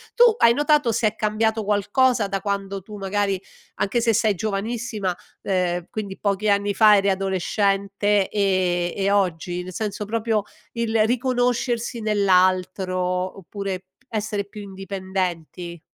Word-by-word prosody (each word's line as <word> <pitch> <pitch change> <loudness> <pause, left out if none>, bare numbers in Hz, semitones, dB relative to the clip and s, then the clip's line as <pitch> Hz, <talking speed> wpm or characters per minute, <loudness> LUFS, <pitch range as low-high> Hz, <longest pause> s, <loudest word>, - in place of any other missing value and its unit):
tu 485 - +6 0.2
hai 235 - +6
notato 295 -3 +3
se 225 0 +2
è 210 - -2
cambiato 220 +1 0
qualcosa 210 +3 +2
da 195 -1 -3
quando 200 -1 -3
tu 210 +2 -10
magari 195 -1 -1 0.3
anche 230 +4 0
se 230 -1 +3
sei 215 -2 +2
giovanissima, 215 -1 -2 0.3
ehm, 180 -2 0
quindi 200 -3 -5
pochi 205 +1 0
anni 200 0 +2
fa 210 0 +6
eri 200 0 +2
adolescente 195 +1 +1
e 185 -3 +1
e 200 0 +1
oggi? 180 -2 0
Nel 185 0 -8
senso 210 +1 -3
proprio 220 -1 0 0.3
il 225 -2 +1
riconoscersi 245 -1 0
nell'altro 185 -2 +2 0.4
oppure 195 0 -5 0.2
essere 210 -2 -2
più 210 +1 -10
indipendenti? 185 -3 -4
200 Hz, 130 wpm, -23 LUFS, 190-220 Hz, 0.4 s, tu